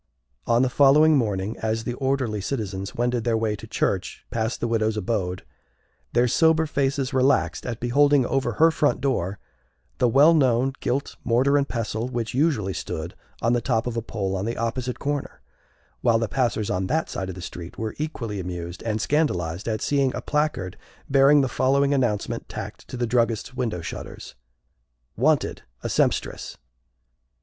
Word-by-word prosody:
On 120 +2 +4
the 130 - +2
following 150 +3 +6
morning, 105 -4 -1
as 110 0 -1
the 120 - -3
orderly 130 -5 -1
citizens 100 -4 -4
wended 120 -1 0
their 115 -1 +1
way 110 -1 0
to - - -11
church - - -2
past 110 +1 -1
the 120 - -1
widow's 110 -1 0
abode, 95 -3 -2 0.7
their 120 +1 +4
sober 160 +5 +3
faces 140 -2 -1
relaxed 130 0 +2
at 120 -2 -4
beholding 140 +2 +3
over 135 +2 0
her 165 +1 +5
front 150 -2 +1
door 100 -8 -1 0.6
the 125 - +4
well 140 +7 +6
known 130 -3 +3
gilt 135 +3 -2
Mortar 130 +4 +3
and 140 -1 +2
Pestle 115 0 -2
which 120 -3 -3
usually 130 - +1
stood 80 0 -5 0.3
on 115 +1 +3
the 120 - +1
top 115 -1 0
of 120 -2 -3
a 115 - -1
pole 100 -4 -3
on 95 +1 -2
the 115 - -3
opposite 125 +2 -2
corner; 145 -1 -3 0.6
while 115 - +4
the 115 0 -1
passers 110 -3 0
on 95 0 -1
that 160 +7 0
side 95 -1 -4
of 95 - -6
the - - -9
street 85 -1 -8
were 110 -1 -3
equally 115 -9 -4
amused 90 -1 -6
and 110 -1 -2
scandalized 95 - 0
at 110 -1 -1
seeing 140 -3 +1
a - - -3
placard 150 -12 -1 0.3
bearing 140 +1 +6
the 135 - +1
following 140 +4 +2
announcement 120 -7 -1
tacked - - -7
to - - -7
the 120 - 0
druggist's 115 -1 0
window 115 -9 -2
shutters: - - -8 0.8
Wanted, - - +1 0.2
a - - -2
Sempstress! - - -1
120 Hz, 170 wpm, -24 LUFS, 105-135 Hz, 0.8 s, following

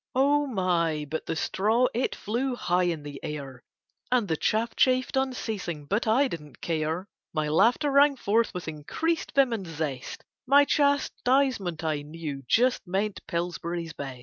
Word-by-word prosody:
Oh 285 +2 +3
my! 170 - 0
but 160 +2 -4
the 165 - -1
straw, 220 +9 +2
it 245 - -1
flew 245 +4 -2
high 180 -5 +1
in 165 -4 -2
the 145 -1 -8
air 140 -4 -6 0.5
And 245 -5 +3
the 160 - +1
chaff 220 +8 0
chaffed 255 +1 +2
unceasing, 220 - -2
but 210 +9 -1
I 255 +6 +4
didn't 150 - -8
care, 160 +2 -2 0.3
My 155 -1 0
laughter 245 - +3
rang 280 +1 +5
forth 230 -1 +1
with 180 -4 -6
increased 235 - -2
vim 270 -3 +4
and 195 -5 -4
zest, 150 -5 -5 0.2
My 285 +2 +6
chastisement 265 - +1
I 155 -2 -1
knew 150 -2 -6
just 250 - +3
meant 195 +3 -1
Pillsbury's 170 -1 -3
Best. 135 -3 -7
190 Hz, 155 wpm, -27 LUFS, 160-255 Hz, 0.5 s, My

